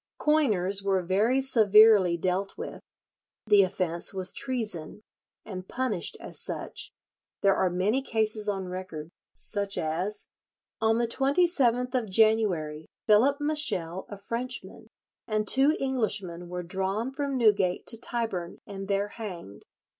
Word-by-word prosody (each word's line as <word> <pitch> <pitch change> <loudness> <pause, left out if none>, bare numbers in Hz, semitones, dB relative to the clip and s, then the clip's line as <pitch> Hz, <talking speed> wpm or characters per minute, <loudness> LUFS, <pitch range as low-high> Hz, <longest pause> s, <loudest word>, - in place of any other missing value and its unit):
Coiners 210 -11 +1
were 195 -2 0
very 215 +9 +2
severely 215 -6 +6
dealt 185 +3 -2
with. 465 +3 -7 0.6
The 210 -2 +6
offence 180 -1 -1
was 185 -1 +1
treason, 215 - -2 0.4
and 185 -3 -7
punished 245 -9 -2
as - - -4
such. - - -3 0.5
There 195 -1 +4
are 185 - +1
many 195 +9 0
cases 215 -4 0
on 195 -2 -3
record, 180 -4 -7 0.2
such 200 -2 -2
as—"On 205 +5 -3
the 235 0 +1
27th 270 -2 +2
of 245 -5 -1
January 185 -8 +1 0.2
Phillip 240 +7 +4
Meshel, 290 - 0
a 205 - -7
Frenchman, 235 +5 -5 0.4
and 215 -1 -1
two 280 +4 +4
Englishmen 200 -10 -2
were 180 0 -4
drawn 195 +7 -2
from 280 -1 -2
Newgate 205 -6 +2
to 230 -1 -1
Tyburn, 205 -8 -3
and 195 -1 -7
there 200 +1 0
hanged. 180 - -9
205 Hz, 125 wpm, -27 LUFS, 185-240 Hz, 0.6 s, severely